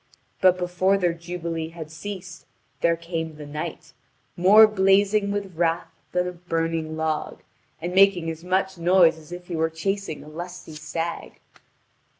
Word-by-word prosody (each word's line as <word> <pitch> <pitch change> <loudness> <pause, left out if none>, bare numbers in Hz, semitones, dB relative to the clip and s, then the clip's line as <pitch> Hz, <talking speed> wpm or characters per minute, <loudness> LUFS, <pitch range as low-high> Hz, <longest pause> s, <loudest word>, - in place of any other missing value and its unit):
But 185 -1 +5
before 180 +2 +1
their 175 -3 +1
jubilee 170 -1 -5
had 160 -2 -9
ceased 190 +2 -8 0.3
there 170 0 +3
came 165 -1 -5
the 150 -1 -9
knight, 150 -1 -6 0.4
more 200 +5 +8
blazing 200 0 +3
with 200 -3 -3
wrath 165 0 0 0.2
than 180 0 0
a - - -3
burning 165 -2 -2
log, 160 -1 -2 0.4
and 175 +2 -4
making 190 -3 +5
as 160 +1 -9
much 190 0 0
noise 170 -1 +5
as 155 +1 -16
if 175 0 -7
he 175 - -4
were 160 0 +1
chasing 195 0 -3
a - - -14
lusty 175 +1 -8
stag. 160 +2 -5
175 Hz, 155 wpm, -24 LUFS, 160-190 Hz, 0.4 s, more